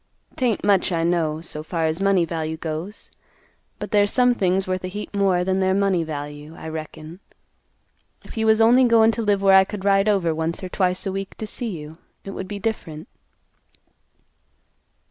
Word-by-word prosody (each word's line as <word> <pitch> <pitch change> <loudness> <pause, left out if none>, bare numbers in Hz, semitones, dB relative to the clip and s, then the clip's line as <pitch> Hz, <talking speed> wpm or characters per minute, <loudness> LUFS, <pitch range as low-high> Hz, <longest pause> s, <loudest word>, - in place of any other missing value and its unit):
'Tain't 245 -5 0
much, 195 -2 +3
I 165 -1 0
know, 165 -2 0
so 155 -2 -4
far 165 +1 -2
as 160 +3 -1
money 195 -3 +3
value 160 -1 -4
goes. 160 +6 -6 0.7
But - - -7
there's 205 -1 +3
some 250 -1 +4
things 190 -3 0
worth 185 0 -2
a - - -2
heap 205 +3 -7
more 190 -3 +2
than 190 +1 0
their 190 0 +2
money 195 -3 +2
value, 150 0 -7
I 160 - -8
reckon. 155 +2 -8 1.0
If - - -12
you 220 -1 0
was 220 0 +4
only 245 +3 +6
goin' 225 -1 +5
t' 230 - -3
live 205 -2 +1
where 195 -1 +5
I 190 - +8
could 200 0 -7
ride 195 +1 +3
over 185 -6 +1
once 160 +3 -3
or 185 - -5
twice 185 0 0
a 195 - -1
week 195 0 -5
to 220 - -4
see 230 +2 -4
you, 150 +2 -11 0.2
it 195 - -7
would 190 -1 -6
be 205 - -5
different." 195 -8 -5
190 Hz, 190 wpm, -22 LUFS, 160-205 Hz, 1.0 s, I